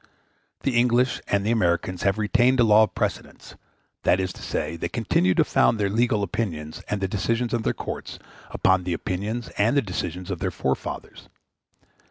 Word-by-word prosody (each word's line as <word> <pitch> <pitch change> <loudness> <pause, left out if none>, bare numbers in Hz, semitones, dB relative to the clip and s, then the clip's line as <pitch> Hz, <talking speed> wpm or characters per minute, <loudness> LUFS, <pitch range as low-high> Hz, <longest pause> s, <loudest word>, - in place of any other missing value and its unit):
The 135 - -1
English 125 +1 +2
and 100 0 +1
the 110 - +1
Americans 90 -4 0
have 100 +1 +1
retained 120 +4 +3
the 120 - +5
law 110 -1 +6
of 110 - +1
precedents; - - -4 0.5
that 90 - +3
is 95 0 -2
to - - -13
say, 75 +2 -3
they 85 - -4
continue 95 -6 +1
to - - +5
found - - +2
their 100 -1 +1
legal 110 -1 +1
opinions 85 -6 -4
and 105 -2 -2
the 95 - +1
decisions 115 +5 -1
of 120 - +1
their - - 0
courts - - -6 0.3
upon 95 -1 +2
the 90 -1 -2
opinions 105 +7 -3
and 115 +7 +3
the - - +5
decisions 90 -1 -4
of 90 - -3
their - - -1
forefathers. 65 0 -4
100 Hz, 185 wpm, -24 LUFS, 90-115 Hz, 0.5 s, law